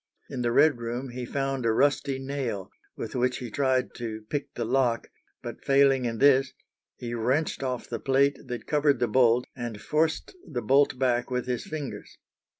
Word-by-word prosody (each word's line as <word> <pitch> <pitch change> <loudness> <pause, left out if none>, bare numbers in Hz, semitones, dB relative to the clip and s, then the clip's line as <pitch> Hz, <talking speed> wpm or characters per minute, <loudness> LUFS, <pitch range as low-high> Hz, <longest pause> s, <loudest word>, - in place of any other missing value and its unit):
In 130 - -3
the 120 -1 +1
"Red 145 0 +4
room" 120 +3 -4
he 125 0 -6
found 135 -2 -2
a 115 - +3
rusty 140 +2 +2
nail, 130 -8 -4 0.2
with - - -6
which 125 0 +1
he 120 -3 -7
tried 130 0 +1
to 110 -2 -5
pick 145 -1 -2
the 120 - -2
lock, 125 -1 +1 0.3
but - - -7
failing 135 -2 +4
in 115 -1 -2
this, 135 0 +4 0.4
he 120 -1 -6
wrenched 130 +8 0
off 125 -2 -3
the - - -4
plate 140 +1 +2
that 120 -3 -5
covered 145 -1 +2
the 120 - +1
bolt 120 +1 +4
and 120 -4 -5
forced 155 - 0
the 130 -8 -5
bolt 140 0 +3
back 125 -2 +1
with 125 -1 -1
his 125 -1 -2
fingers. 150 -3 -6
130 Hz, 180 wpm, -27 LUFS, 120-140 Hz, 0.4 s, Red